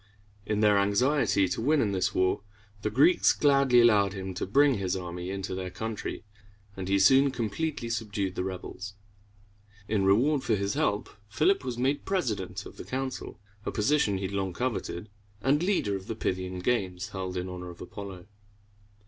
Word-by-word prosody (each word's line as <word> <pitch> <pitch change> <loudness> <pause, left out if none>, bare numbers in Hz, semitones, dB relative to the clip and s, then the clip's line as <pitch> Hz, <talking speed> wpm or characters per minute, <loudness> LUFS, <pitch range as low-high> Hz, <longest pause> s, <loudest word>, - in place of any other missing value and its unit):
In 105 -1 0
their 105 -1 +5
anxiety 100 0 +2
to 90 - -2
win 150 +5 +3
in 105 -6 +1
this 95 -2 0
war, 95 +1 +2 0.4
the 105 - -1
Greeks 140 - +5
gladly 140 -4 +4
allowed 105 -4 +4
him 95 -1 -5
to 90 - -4
bring 135 +2 +4
his 95 -1 -1
army 90 -1 -5
into 95 0 -4
their 95 0 -4
country, 110 +4 -5 0.5
and 95 -1 -5
he 100 - +3
soon 135 +8 +6
completely 130 +3 -3
subdued 105 -4 -2
the 90 - -2
rebels. 95 +2 -6 0.9
In 105 -2 +1
reward 125 +10 +3
for 115 - +1
his 100 0 -1
help, 105 0 0 0.2
Philip 155 - +2
was 125 -2 -4
made 135 +4 0
president 115 - -2
of - - -11
the - - -7
council, 130 -3 -5 0.2
a - - -2
position 105 -3 +2
he 95 - -5
had 95 - -2
long 95 -2 -1
coveted, 110 -5 -3 0.3
and 140 +7 +2
leader 175 - +1
of 95 0 -7
the 115 - -3
Pyth´i 95 -4 -2
an 90 0 -6
games 95 -4 -1
held 95 -2 -4
in 90 +1 -3
honor 90 -1 -7
of 85 - -11
Apollo. 95 -3 -8
100 Hz, 180 wpm, -28 LUFS, 95-130 Hz, 0.9 s, soon